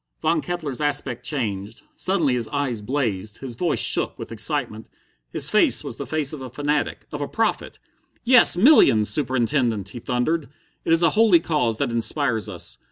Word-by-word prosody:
Von 160 0 0
Kettler's 155 -7 -5
aspect 140 -4 -2
changed. 110 -7 -4
Suddenly 170 -8 0
his 120 -3 -2
eyes 140 -6 -3
blazed, 110 -5 -3
his 130 -3 -8
voice 160 +7 -1
shook - - +1
with - - -9
excitement, 115 -2 -3 0.4
his - - +1
face - - +3
was - - -7
the - - -7
face 155 -2 -1
of 150 - -7
a 130 - -7
fanatic, 145 +3 -2
of 150 - -6
a 145 - -3
prophet. 225 0 -2 0.5
"Yes, 245 -7 +7
millions, 180 - +5
Superintendent," 120 -6 -1
he 120 - -8
thundered. 130 +6 -2 0.4
"It - - -1
it 165 +1 +3
a 165 - +5
holy 210 -4 +4
cause 150 -9 -1
that 120 - -2
inspires 115 -1 0
us. - - -6
140 Hz, 170 wpm, -22 LUFS, 115-155 Hz, 0.5 s, Yes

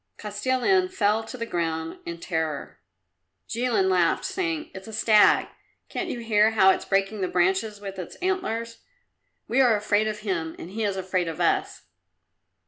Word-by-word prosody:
Kostilin 260 - +1
fell 220 - +1
to 255 - -8
the 230 - -3
ground 165 -4 -3
in 170 0 -5
terror; 160 -4 -3 0.7
Jilin 230 -5 +1
laughed, 180 -3 +2
saying, 335 -5 -2
"It's 190 +2 -9
a 220 - -9
stag. 215 -1 +4 0.4
Can't - - -3
you 240 - -4
hear 215 -1 +4
how 200 -4 +5
it's - - -2
breaking 195 +1 0
the 185 - +1
branches 190 +4 +1
with 195 -1 -7
its 180 - -7
antlers? 230 -12 -2 0.7
We 255 +4 +3
are 240 -4 +5
afraid 210 +1 +1
of 210 -1 -4
him 170 -6 -3
and 170 - -9
he 220 +2 -3
is 200 -2 -1
afraid 185 -2 -1
of 165 0 -5
us." 170 - 0
210 Hz, 165 wpm, -25 LUFS, 185-230 Hz, 0.7 s, how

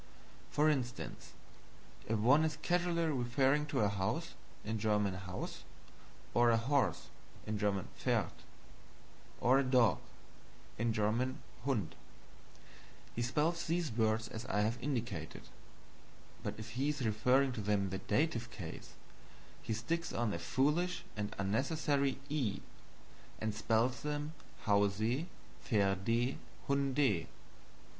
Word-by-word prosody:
For 150 +1 +3
instance, 130 -5 -2 0.7
if 110 - +1
one 130 +9 +5
is 160 -1 0
casually 175 -1 +2
referring 135 +1 +2
to - - 0
a 105 - +4
house, 100 -1 -1 0.3
HAUS, 105 -4 -1 0.7
or 120 0 +5
a 115 - +5
horse, 125 - +1 0.4
PFERD, 105 -3 0 1.1
or 130 +3 +5
a - - +3
dog, 125 -7 +4 0.8
HUND, 115 - -1 1.2
he 120 - -1
spells 160 +8 +1
these 165 -3 0
words 110 0 +1
as 110 - -6
I 105 - +1
have 110 +3 0
indicated; 115 - -3 1.0
but - - -3
if 110 +1 -7
he 135 +5 0
is 145 -4 -1
referring 125 +5 +3
to 120 -3 -4
them 105 0 +2
in 95 - -1
the 95 - -1
Dative 120 -7 0
case, 95 -7 -8 0.7
he - - -5
sticks 165 +10 -2
on 115 -3 0
a 85 - -3
foolish 150 - +1
and 105 -1 -3
unnecessary 135 - +1
E 135 -9 -1 0.8
and 110 -1 -2
spells 115 +3 +1
them 150 +1 -3 0.3
HAUSE, 105 - +2 0.4
PFERDE, 110 +4 +1 0.3
HUNDE. 140 - +2
120 Hz, 110 wpm, -35 LUFS, 105-140 Hz, 1.2 s, one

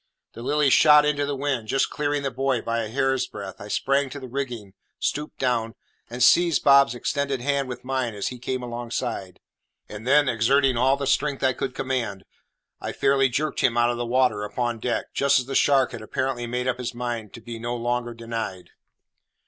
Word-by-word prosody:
The 115 - -9
Lily 145 +2 +2
shot 150 +1 +7
into 145 -1 0
the 145 - -2
wind, 135 -5 -2
just 135 +4 +1
clearing 145 -1 -1
the 135 - -1
buoy 135 -2 0
by 115 +1 -2
a 110 - -3
hair's 135 +3 0
breadth. 100 0 -8
I 105 - -8
sprang 135 +5 +1
to 145 - -7
the 130 - -8
rigging, 120 -6 -5 0.2
stooped 150 +1 -3
down, 120 -3 -1 0.3
and 120 +1 -1
seized 170 +2 +5
Bob's 140 -3 +6
extended 140 +2 -1
hand 140 0 0
with 125 - -7
mine 130 -3 -2
as 100 - -2
he 125 - -9
came 130 +1 -3
alongside, 120 -5 -4 0.5
and 105 +3 -9
then, 145 +1 +5
exerting 130 +3 +3
all 130 +3 +3
the 140 - -3
strength 140 +1 0
I 130 0 +3
could 130 +1 -4
command, 120 -8 -3 0.5
I - - -5
fairly 135 -1 +3
jerked 150 +5 -2
him 120 -2 +2
out 120 0 +3
of 120 - -4
the 120 - -2
water 125 -4 +2
upon 120 +2 -2
deck, 120 +1 -2
just 140 0 +3
as 125 - 0
the 135 - -6
shark 135 -1 +3
had - - -7
apparently 120 +2 -2
made 125 +1 -2
up 125 0 -1
his 125 -1 -4
mind 120 -4 -4
to - - -9
be 115 0 -8
no 120 +1 -3
longer 120 0 -2
denied. 115 -5 -5
125 Hz, 205 wpm, -24 LUFS, 115-135 Hz, 0.5 s, shot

